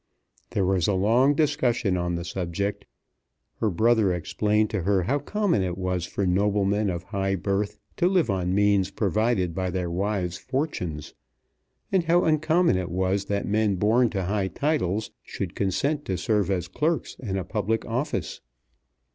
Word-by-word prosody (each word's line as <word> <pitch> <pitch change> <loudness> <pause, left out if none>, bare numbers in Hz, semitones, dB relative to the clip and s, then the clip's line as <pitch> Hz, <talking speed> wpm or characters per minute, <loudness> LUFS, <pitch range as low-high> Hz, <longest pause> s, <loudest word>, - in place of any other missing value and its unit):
There 100 - 0
was 95 -2 +1
a 100 - +2
long 120 +9 +3
discussion 125 - +1
on 85 -1 -1
the 85 0 -4
subject. 95 +3 -3 0.7
Her 110 - +1
brother 110 +1 +3
explained 105 +5 0
to 110 - -1
her 95 +1 +2
how 140 +11 0
common 200 - 0
it 90 -1 -2
was 90 -2 -2
for 100 - -2
noblemen 100 +2 +1
of 90 -1 -3
high 95 0 -1
birth 100 +2 -1 0.2
to 175 - +3
live 185 -3 +2
on 95 -2 0
means 100 -2 +3
provided 105 -2 0
by 95 +1 -2
their 90 -1 -2
wives' 90 -1 -2
fortunes, 130 - -3 0.8
and 185 -3 +2
how 175 +2 +4
uncommon 155 - +3
it 90 -1 -3
was 95 +3 0
that 100 0 -1
men 105 -1 +1
born 110 +6 +3
to 95 -3 -2
high 100 +1 0
titles 110 - -1
should - - -5
consent 140 - 0
to 95 - -2
serve 100 +2 +1
as 90 -3 -1
clerks 155 - -1
in 100 -6 -3
a 95 - -2
public 110 +3 -1
office. 130 +6 -3
100 Hz, 165 wpm, -25 LUFS, 95-115 Hz, 0.8 s, how